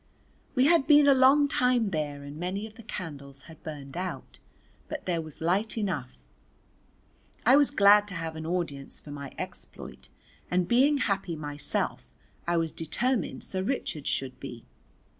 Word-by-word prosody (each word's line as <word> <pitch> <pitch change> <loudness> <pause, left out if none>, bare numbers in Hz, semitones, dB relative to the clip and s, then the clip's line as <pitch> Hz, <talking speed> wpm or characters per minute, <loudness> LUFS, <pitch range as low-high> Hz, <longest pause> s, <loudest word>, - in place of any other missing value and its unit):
We 255 0 +4
had 315 -3 +4
been 295 -1 +7
a 280 - +7
long 270 +2 +6
time 250 -6 +2
there 145 -3 -3
and 145 +1 -8
many 185 +5 -3
of 220 - -10
the 230 - -13
candles 140 - -8
had 160 -1 -14
burned 145 -3 -8
out, 185 +1 -5 0.5
but 305 -2 -6
there 170 -2 0
was 155 -1 -10
light 195 +8 0
enough. 165 - -3 1.2
I 250 +4 +7
was 285 -1 +5
glad 205 -4 +6
to 195 - -7
have 165 -1 -4
an 160 0 -5
audience 165 -6 -3
for 145 - -11
my 140 -2 -7
exploit, - - -8 0.4
and 180 -1 +1
being 270 +6 +4
happy 195 -8 -1
myself 145 - -2 0.4
I 170 0 +2
was 165 -1 0
determined 240 - -1
Sir 185 - -3
Richard 190 - -3
should 130 -1 -2
be. 120 -4 -8
180 Hz, 160 wpm, -28 LUFS, 150-235 Hz, 1.2 s, been